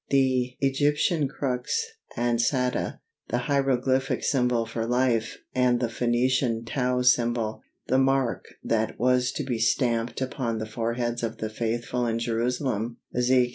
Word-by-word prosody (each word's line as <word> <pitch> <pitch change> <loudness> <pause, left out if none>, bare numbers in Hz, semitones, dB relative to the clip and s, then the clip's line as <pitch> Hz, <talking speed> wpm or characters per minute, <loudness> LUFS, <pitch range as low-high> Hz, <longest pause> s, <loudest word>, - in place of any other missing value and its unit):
The 130 -2 +2
Egyptian 145 +3 +2
crux 135 - -2 0.3
ansata, 120 +2 0 0.3
the - - 0
hieroglyphic 135 0 +1
symbol 125 -3 +2
for 115 0 -3
"life," 120 -2 +1 0.2
and 125 -1 +3
the 120 -2 0
Phœnician 120 0 +1
Tau 125 0 0
symbol, 120 -3 +2 0.2
the 130 - +2
"mark" 135 -2 +1 0.2
that 110 -1 0
was 125 0 +3
to 150 - -2
be 125 -4 -2
stamped 115 0 +1
upon 130 -3 -2
the 110 - -3
foreheads 115 +2 -2
of 115 - -3
the 110 0 -4
faithful 120 +2 -1
in 115 0 0
Jerusalem 115 0 -1 0.2
(Ezek. 125 0 +3
125 Hz, 135 wpm, -26 LUFS, 115-130 Hz, 0.3 s, and